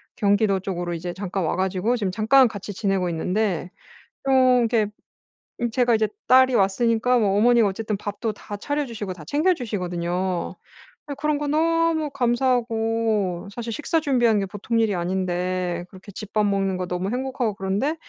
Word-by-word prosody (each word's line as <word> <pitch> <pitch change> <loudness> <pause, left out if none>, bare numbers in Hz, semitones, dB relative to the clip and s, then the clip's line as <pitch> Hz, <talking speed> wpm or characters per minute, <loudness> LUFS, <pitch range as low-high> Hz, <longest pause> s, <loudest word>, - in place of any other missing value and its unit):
경기도 200 -1 +2
쪽으로 175 -2 -4
이제 175 +1 -4
잠깐 190 -1 -3
와 - - 0
가지고 190 +5 0
지금 200 -5 -1
잠깐 235 +6 +5
같이 205 -1 -7
지내고 190 -3 0
있는데 180 +1 -1 0.6
좀 255 -2 +4
이렇게 225 -2 +2 0.7
음 240 -1 0
제가 245 0 +2
이제 215 -1 +2 0.2
딸이 260 0 +6
왔으니까 230 +5 +2
뭐 200 -3 +2
어머니가 235 -1 +5
어쨌든 210 +1 -3
밥도 205 +2 -4
다 205 0 -8
차려 290 +6 -2
주시고 210 -5 -5
다 165 -4 -11
챙겨주시거든요. 185 - -1 0.5
예 - - -2
그런 300 -1 0
거 295 0 -3
너무 325 0 +1
감사하고 225 -6 0
사실 235 -1 -5
식사 320 +2 0
준비하는 240 -8 +2
게 195 - -2
보통 215 +4 -2
일이 215 -3 +2
아닌데 180 0 -2
그렇게 190 +2 -13
집 210 +2 -9
밥 215 -1 +2
먹는 195 -2 0
거 180 - -3
너무 180 +3 -3
행복하고 250 -4 -2
그런데 200 +12 -1
215 Hz, 360 characters per minute, -23 LUFS, 190-245 Hz, 0.7 s, 딸이